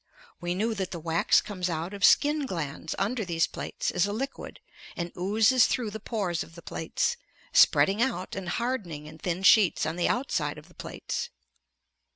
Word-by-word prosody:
We 175 0 -2
knew 220 +4 0
that 190 -3 -3
the 170 - -6
wax 165 +1 +3
comes 185 -3 -3
out 165 +3 -3
of 200 -1 -6
skin 295 +3 +4
glands 160 - -4
under 220 +4 -1
these 170 -3 +1
plates - - -4
as 180 +2 +1
a - - -3
liquid, 270 +6 -5 0.4
and 170 0 -3
oozes 220 +7 +4
through 230 -4 -1
the 220 - -6
pores 200 -6 -2
of 165 - -9
the 170 - -12
plates, 320 - -1 0.4
spreading 200 +3 +5
out 240 -7 -1
and 190 -2 -5
hardening 195 - -3
in 155 +1 -11
thin 180 +2 -2
sheets 200 -2 +5
on 160 +2 -3
the 175 - +1
outside 245 +5 -1
of - - -13
the - - -19
plates. - - -5
190 Hz, 185 wpm, -28 LUFS, 170-225 Hz, 0.4 s, spreading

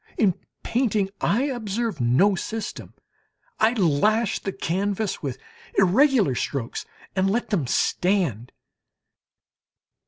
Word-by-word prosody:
In 200 -6 +3 0.3
painting 215 -5 0
I 235 +6 +2
observe 230 - -2
no 130 +13 +4
system; 220 +4 -5 0.6
I 225 +2 +4
lash 210 +3 +2
the 195 - -4
canvas 195 +3 -2
with 135 -4 -4 0.4
irregular 205 - +4
strokes 125 -1 -3 0.3
and 190 0 +2
let 230 +2 -1
them 165 - 0
stand. 165 - 0
200 Hz, 100 wpm, -24 LUFS, 170-225 Hz, 0.6 s, no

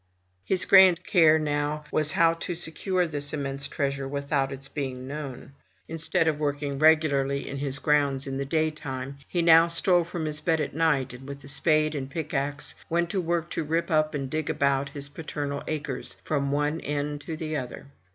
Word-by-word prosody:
His 185 - +3
grand 185 -3 +7
care 160 -5 +5
now 150 0 -1
was 155 0 +2
how 165 0 +4
to 170 +1 -5
secure 180 +2 -1
this 145 -3 -4
immense 140 -1 -3
treasure 140 -1 -2
without 140 0 -1
its 135 0 -7
being 130 -3 -5
known. 140 -2 -7 0.3
Instead 165 0 0
of 155 -2 +1
his - - -13
working 145 -1 -2
regularly 145 -3 +3
in 140 - -5
his 140 -1 -2
grounds 140 -2 +1
in 135 -1 -4
the - - 0
daytime, 140 -3 -2
he 175 -2 0
now 165 0 +7
stole 170 +1 +3
from 165 -1 -5
his 150 0 -4
bed 160 0 +1
at - - -2
night, 145 -6 +1
and 130 +2 -11
with 140 -1 -8
spade 155 +1 +2
and 135 -3 -4
pickaxe 145 -2 -2 0.2
went 170 +1 0
to 195 - 0
work 170 0 -1
to 165 - -2
rip 165 +3 -1
up 155 -1 +2
and 135 -2 -4
dig 155 0 -2
about 140 -2 +1
his 140 -1 -3
paternal 145 -1 -5
acres, 145 -4 -4
from 140 -2 -1
one 150 +2 0
end 145 0 -3
to 160 +1 -6
the 155 -1 -4
other. 130 -2 -5
150 Hz, 190 wpm, -26 LUFS, 140-160 Hz, 0.3 s, grand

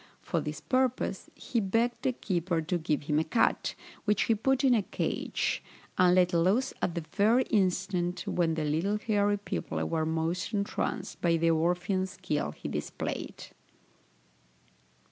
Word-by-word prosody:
For - - -1
this 150 0 -5
purpose 255 +4 0
he 235 - -2
begged 225 +4 0
the 260 - +1
keeper 180 -7 -1
to 160 +3 -1
give 155 -2 -1
him 150 +1 +1
a - - +2
cat, 225 - +1 0.3
which 210 -2 +3
he 230 - +3
put 265 +5 +1
in 260 -2 +5
a 225 - +4
cage, - - -2 0.3
and 180 -1 +5
let 180 0 +4
loose 195 +11 +2
at 175 - 0
the 170 -2 -3
very 220 +6 +4
instant 185 -2 +1
when 165 -2 +1
the 155 -1 -1
little 165 +8 +1
hairy 205 -2 +1
people 205 - -4
were 160 -1 0
most 165 +5 -1
entranced 200 -1 -2
by 170 -1 +3
the 165 0 +3
Orphean 180 +4 +1
skill 175 - -2
he - - -8
displayed. - - -4
185 Hz, 155 wpm, -29 LUFS, 165-210 Hz, 0.3 s, in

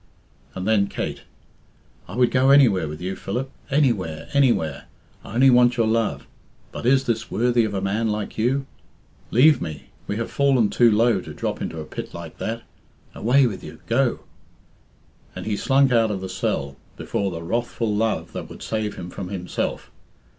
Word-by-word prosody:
And 95 +1 -4
then 105 -3 +3
Kate - - -4 0.9
"I - - -8
would 125 0 +3
go 130 +1 +3
anywhere 135 - +5
with 75 +2 -7
you, 95 +2 -3
Philip, 125 +9 -4 0.2
anywhere, 115 - 0
anywhere. 120 - +2 0.4
I 110 - -9
only 130 +2 +6
want 120 0 +5
your 115 - +3
love. 110 0 0 0.5
But - - -4
is 135 +1 +4
this 115 -3 -2
worthy 120 +1 +2
of 105 -2 -3
a 95 - -1
man 105 +4 0
like 105 -1 -3
you? 130 +5 0 0.6
Leave 135 +3 +5
me. 80 -3 -6 0.2
We 100 - -2
have 115 +1 -3
fallen 130 -7 +3
too 120 +2 +5
low 115 +2 +3
to - - -10
drop - - -3
into 80 - -4
a 80 - -6
pit - - -7
like 85 -2 -9
that. 115 +1 -3 0.5
Away 130 +4 +3
with 105 -6 -3
you! 80 0 -10
Go!" 125 +1 +1 1.1
And - - -6
he 110 - -1
slunk 135 +4 +3
out 115 -2 +4
of 100 -3 -3
the 95 - -5
cell, 70 -6 -2 0.2
before 100 - -2
the 85 -2 -6
wrathful 115 +2 -1
love 110 +1 -1
that - - -6
would - - -10
save 110 -2 -2
him 90 0 -7
from 90 - -6
himself. 90 -2 -4
110 Hz, 180 wpm, -23 LUFS, 95-125 Hz, 1.1 s, only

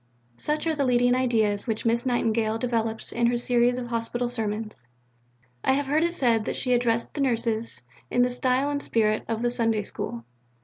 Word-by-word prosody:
63. - - -13
Such 300 +1 -1
are 320 -1 +1
the 285 - 0
leading 245 -1 +3
ideas 225 -5 +1
which 220 0 -2
Miss 235 +3 +1
Nightingale 225 -2 +1
develops 225 -2 -2
in 235 0 +1
her 240 0 +1
series 245 0 +2
of 250 - -3
Hospital 240 +1 -2
Sermons. 215 - -4 0.8
I 265 - +3
have 285 +1 0
heard 300 +4 +2
it 340 +1 0
said 230 -7 +2
that - - -2
she 250 - 0
addressed 235 -1 +1
the 290 - -3
Nurses 230 -3 0 0.3
in 245 - +3
the 250 - +1
style 255 +3 +1
and 285 0 -2
spirit 215 -4 +1
of 230 0 -2
the 240 - +2
Sunday 225 -3 +1
School. 115 -11 -6
240 Hz, 200 wpm, -26 LUFS, 225-250 Hz, 0.8 s, leading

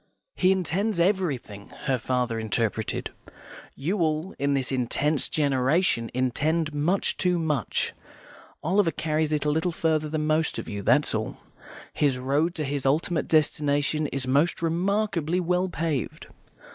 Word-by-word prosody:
"He 185 0 +3
intends 190 +2 0
everything," 160 - -1
her 130 -3 0
father 125 -1 -1
interpreted. 110 0 -2 0.6
"You 180 +9 -2
all, 160 +2 0
in 140 0 +1
this 135 -1 -1
intense 135 +3 +1
generation, 135 -2 +1
intend 155 +5 0
much 160 +7 +1
too 180 -1 +2
much; 150 -7 -1 0.7
Oliver 185 +2 +3
carries 155 0 -1
it 150 -1 0
a 150 - +2
little 160 +4 0
further 155 -2 0
than 155 0 -1
most 155 +1 +1
of - - -5
you, 100 -1 -4
that's - - +3
all. - - -3 0.6
His 140 -4 +1
road 145 +7 0
to 155 - -2
his 140 -1 -2
ultimate 155 +4 +1
destination 150 -1 +2
is 135 -2 -3
most 145 +7 +1
remarkably 180 0 0
well 180 +1 0
paved." 160 -7 -3
155 Hz, 140 wpm, -26 LUFS, 135-170 Hz, 0.7 s, He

